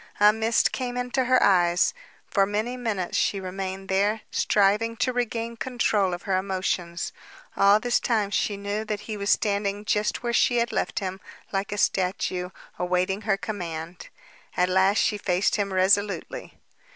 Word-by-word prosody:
A 210 +1 +7
mist 225 +1 +2
came 250 -1 -3
into 250 +1 -1
her 255 0 +4
eyes. 175 -2 +3 0.3
For 195 -1 +2
many 215 +5 -2
minutes 220 -7 -3
she 200 - +1
remained 190 +1 -5
there, 205 +3 +1
striving 210 +3 +2
to 255 - 0
regain 235 -1 -2
control 220 -6 0
of 175 - -12
her 190 -2 0
emotions. 185 -3 -2 0.4
All 200 +1 +5
this 245 +1 +1
time 215 -4 0
she 205 0 0
knew 205 +2 -3
that 210 -1 -3
he 215 - -6
was 200 0 -3
standing 205 0 0
just 210 +3 0
where 240 -1 -1
she 245 +1 +3
had 235 0 +1
left - - -2
him, 190 -1 -3 0.3
like 195 0 -2
a 205 - -3
statue, 180 -2 0 0.3
awaiting 180 +2 0
her 195 - +3
command. 175 -5 -6 0.5
At 180 0 +3
last 190 +3 +3
she 210 - +1
faced 185 +1 +1
him 200 -1 -1
resolutely. 195 +2 0
200 Hz, 165 wpm, -25 LUFS, 190-220 Hz, 0.5 s, A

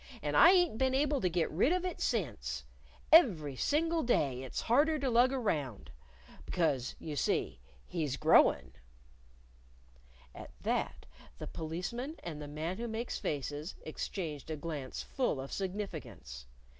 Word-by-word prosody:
"And - - -1
I 340 - +9
ain't 355 - +4
been 260 0 +2
able 285 0 +1
to 180 - +2
get 170 -1 0
rid 195 - +3
of 365 0 +1
it 360 - -4
since. 65 - -2 0.5
Every 180 - +6
single 325 - +1
day 140 - +1
it's 130 - -4
harder 295 +7 +3
to 270 -3 -1
lug 245 +2 +5
around. 150 - -2 0.5
Because, 140 -8 0
you 155 -2 -6
see, 65 - 0 0.3
he's 150 -6 -2
growin'." 65 - +4 1.6
At - - -10
that, - - -2 0.3
the - - -6
Policeman 180 - -4
and 155 -3 -6
the 145 - -6
Man 155 +5 -4
Who 235 - -3
Makes 230 +2 -3
Faces 145 +3 -3
exchanged 155 -2 -5
a 160 - -2
glance 145 -4 -5
full 250 - -1
of 135 +1 -6
significance. 155 - -5
170 Hz, 145 wpm, -32 LUFS, -, 1.6 s, I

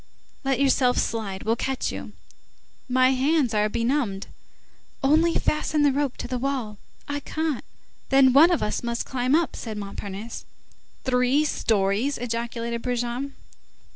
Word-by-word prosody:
"Let 270 -1 +1
yourself 265 -2 +3
slide, 200 -4 -2
we'll 225 +1 +1
catch 265 +2 -2
you." - - -7 0.8
"My 255 +1 +4
hands 265 -1 +2
are 210 0 +2
benumbed." 230 -4 -1 0.8
"Only 320 +5 +4
fasten 305 0 +1
the 290 - +5
rope 280 -1 -1
to - - -5
the 250 0 -2
wall." 245 -6 -3 0.3
"I 285 0 -2
can't." 310 -1 -2 0.5
"Then 270 -1 +6
one 305 +6 +8
of 345 - +1
us 210 - -1
must 235 0 -2
climb 255 +1 +1
up," 335 0 +1
said 220 -3 -6
Montparnasse. 200 +2 -6 0.6
"Three 255 +3 +2
stories!" 220 +1 +1
ejaculated 235 0 -3
Brujon. 245 +3 -2
250 Hz, 140 wpm, -25 LUFS, 230-280 Hz, 0.8 s, one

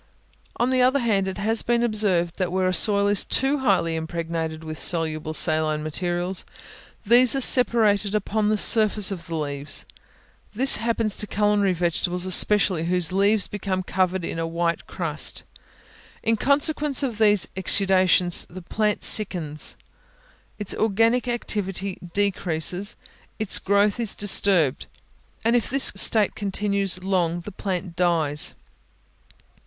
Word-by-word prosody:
On 245 +2 0
the 255 -1 +1
other 255 +2 +3
hand, 210 -7 0
it 190 - -5
has 220 +2 -1
been 240 0 0
observed, 195 -7 0
that 185 -2 -2
where 185 0 0
a 185 - 0
soil 200 +3 +4
is 205 -1 +3
too 275 +2 0
highly 185 -9 0
impregnated 160 0 -5
with 155 -2 -7
soluble 155 -2 -1
saline 155 -1 +1
materials, 175 +3 -3 0.6
these 245 +4 +5
are - - 0
separated 215 -6 +5
upon 210 +1 -1
the 215 - +1
surface 215 -2 +3
of 175 -4 -7
the 165 - -5
leaves. 145 -1 -3 0.7
This 265 +5 +4
happens 225 -2 -1
to 210 - -3
culinary 205 -2 +1
vegetables 175 +1 -2
especially, 185 -2 +3
whose 180 0 +1
leaves 200 +2 +1
become 190 -2 -4
covered 185 -1 -1
with 165 - -5
a 165 - -3
white 170 0 -3
crust. 160 -4 -2 0.8
In 225 - +1
consequence 290 +2 +1
of 235 -5 -4
these 210 -3 +3
exudations 185 -2 +1
the 185 +1 -11
plant 210 +3 -2
sickens, 170 -8 -1 0.8
its 205 -3 -3
organic 225 +4 0
activity 200 -5 -3
decreases, 190 0 -2 0.4
its 215 -3 +1
growth 200 +3 +1
is 230 -4 -2
disturbed; 190 -8 +1 0.6
and 230 +1 +2
if 235 - 0
this 270 +1 +4
state 215 -4 +3
continues 200 -2 -2
long, 175 -3 -1
the 210 - -9
plant 185 -2 -5
dies. 160 -5 0
195 Hz, 140 wpm, -23 LUFS, 175-215 Hz, 0.8 s, these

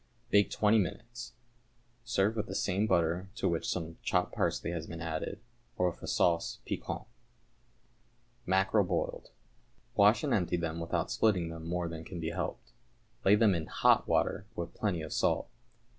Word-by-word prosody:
Bake 100 -2 +5
twenty 110 +2 +3
minutes. 120 +5 -4 0.7
Serve 110 -2 +1
with 105 -2 -2
the - - -5
same 100 +3 +1
butter 85 +1 +1
to 120 - -8
the - - +3
which 85 -1 -1
some 80 -2 -3
chopped - - 0
parsley - - 0
has 80 -2 -4
been 85 - -7
added, 80 +5 -4 0.4
or 90 -1 +2
with - - -17
a - - -7
sauce 85 -1 +2
piquante. - - -4 1.4
=Mackerel, 95 +3 +3
Boiled.= 90 - -2 0.6
Wash 105 +6 +5
and 140 -4 +1
empty 90 -4 +1
them 85 -1 -3
without 85 0 -1
splitting 95 -7 +2
them 80 0 -7
more 90 0 -1
than 80 -1 -6
can 85 +1 -7
be 80 0 -2
helped. - - -4 0.5
Lay 100 - +6
them 105 -2 +5
in 80 -3 -2
hot - - +3
water 95 +3 +1
with 85 0 -4
plenty 90 -7 -1
of 80 - -5
salt. - - +1
90 Hz, 170 wpm, -31 LUFS, 85-105 Hz, 1.4 s, Lay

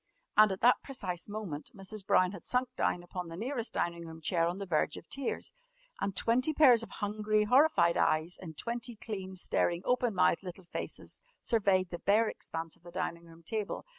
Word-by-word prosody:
And 215 -1 +7
at 190 - -4
that 245 +2 +6
precise 185 -10 -5
moment 205 -8 -5
Mrs. 195 +1 -6
Brown 185 0 +4
had 195 -4 -9
sunk 250 0 0
down 175 - 0
upon 180 0 -6
the 165 0 -8
nearest 240 +2 -3
dining 170 0 -1
room 160 0 -9
chair 165 +1 +1
on 175 +2 -2
the 200 - -4
verge 155 -4 +1
of - - -11
tears, 275 -2 -3 0.5
and 195 - -2
twenty 255 +9 +2
pairs 250 -7 +7
of 230 - -3
hungry 210 0 0
horrified 250 - +4
eyes 155 +3 +1
in 165 -4 -8
twenty 235 - -4
clean, 195 -4 -6
staring, 175 -1 0
open 245 -3 +1
mouthed 180 -2 +3
little 185 -1 -9
faces - - -5 0.2
surveyed 195 -5 +2
the 175 - -4
bare 215 +3 +3
expanse 165 -5 -4
of - - -23
the 175 - -12
dining 170 0 -4
room 165 0 -16
table. 215 +4 -3
195 Hz, 195 wpm, -32 LUFS, 170-230 Hz, 0.5 s, And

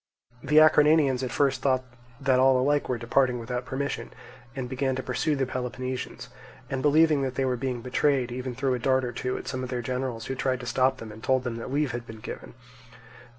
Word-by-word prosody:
The 150 +3 +1
Acarnanians 150 -3 +5
at 130 - -2
first 135 -2 +1
thought 130 -2 +2 0.4
that 130 -2 +2
all 130 0 +5
alike 145 +3 +1
were 125 - 0
departing 125 +2 +1
without 125 +2 -4
permission, 140 +2 -3 0.4
and 130 -2 -3
began 130 +1 -1
to 130 - -4
pursue 145 +4 0
the 135 -1 0
Peloponnesians; 130 0 -5 0.4
and 135 -1 -1
believing 150 0 +4
that 130 -1 -2
they 135 - 0
were 130 -1 +1
being 125 -1 -3
betrayed, 130 -1 +1
even 125 0 -4
threw 130 0 0
a 125 - -1
dart 130 +1 +2
or 120 - -3
two 125 +2 -3
at - - -8
some 130 - -3
of 130 - -5
their 125 -1 -3
generals 125 -2 -3
who 135 - -3
tried 130 -1 -1
to - - -7
stop 130 +2 +2
them 115 -4 -9
and 110 +2 -12
told 130 -1 +2
them 120 -2 -3
that 115 +2 -6
leave 145 -1 +1
had 120 0 -6
been 110 -1 -9
given. 110 - -8
130 Hz, 220 wpm, -27 LUFS, 125-135 Hz, 0.4 s, Acarnanians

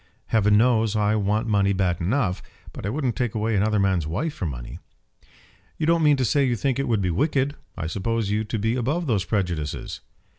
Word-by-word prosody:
Heaven 105 -2 +4
knows 115 -2 +3
I 105 0 +2
want 105 +2 0
money 100 -3 +2
bad 90 -3 0
enough, 100 0 0 0.3
but - - -6
I - - -1
wouldn't 130 -1 -1
take 120 -4 -2
away 110 0 0
another 105 +2 +2
man's 95 -5 +1
wife 110 - -2
for 90 - -4
money." - - -7 1.0
"You 155 - -1
don't 170 +1 +3
mean 150 -2 +4
to 130 - +1
say 140 +4 +2
you 125 -3 +1
think 135 +3 -1
it 135 - -1
would 110 -4 +1
be 90 - 0
wicked. 140 - +1 0.2
I 85 - -3
supposed 100 +6 -1
you 105 +1 0
to 110 +1 -3
be 110 +3 0
above 140 +8 -1
those 105 -9 0
prejudices." 90 -7 -3
110 Hz, 210 wpm, -24 LUFS, 100-125 Hz, 1.0 s, Heaven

